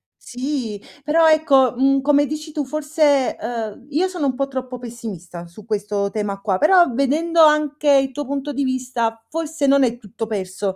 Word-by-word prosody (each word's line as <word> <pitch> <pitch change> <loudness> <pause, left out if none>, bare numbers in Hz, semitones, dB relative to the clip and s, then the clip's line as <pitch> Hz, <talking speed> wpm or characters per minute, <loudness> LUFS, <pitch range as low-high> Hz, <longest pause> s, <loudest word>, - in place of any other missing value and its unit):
Sì 245 -5 -5 0.2
però, 320 +2 +3
ecco, 280 -5 +4
mhmm, 270 +2 +2
come 290 +1 +3
dici 305 +2 -6
tu 300 - -2
forse, 295 -1 +1
uhm, 225 +1 -5
io 320 +6 +1
sono 355 -6 -2
un 255 - -1
po' 275 +1 -1
troppo 260 -2 -5
pessimista 215 -8 -8
su 185 +5 -15
questo 205 -2 -2
tema 205 -1 -3
qua, 195 -2 -1
però 350 - +5
vedendo 310 +6 +1
anche 300 -1 +3
il 270 -1 +3
tuo 290 - -4
punto 280 +2 -4
di 280 - -1
vista, 250 -3 -2
forse 320 -2 -2
non 275 0 +4
è 240 -2 0
tutto 225 0 -7
perso, 195 -2 -4
265 Hz, 180 wpm, -20 LUFS, 225-295 Hz, 0.2 s, però